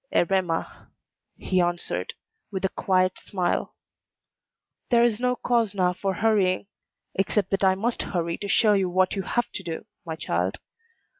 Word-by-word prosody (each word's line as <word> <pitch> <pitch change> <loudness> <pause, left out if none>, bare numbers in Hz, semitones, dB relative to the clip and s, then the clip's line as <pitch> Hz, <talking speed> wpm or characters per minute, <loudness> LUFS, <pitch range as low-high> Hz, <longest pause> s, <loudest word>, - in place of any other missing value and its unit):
"Erema," 175 -2 0 0.5
he 185 -1 +1
answered, 175 0 -1 0.4
with 190 -1 -2
a - - +2
quiet 185 -1 +1
smile, 180 -3 -2 1.1
"there 235 -1 +5
is 235 -2 +2
no 250 0 +1
cause 230 -5 +1
now 180 -2 +2
for 190 +1 -2
hurrying, 205 -4 +2 0.5
except 195 0 0
that 195 0 0
I 190 -1 +5
must 225 +5 -1
hurry 170 -2 -2
to 200 - -4
show 210 +1 +4
you 195 -2 +2
what 185 +2 +2
you 195 - -1
have 240 +5 -1
to - - -4
do, 170 -3 -5 0.2
my 160 -2 -4
child. 90 - -1
190 Hz, 155 wpm, -25 LUFS, 180-210 Hz, 1.1 s, there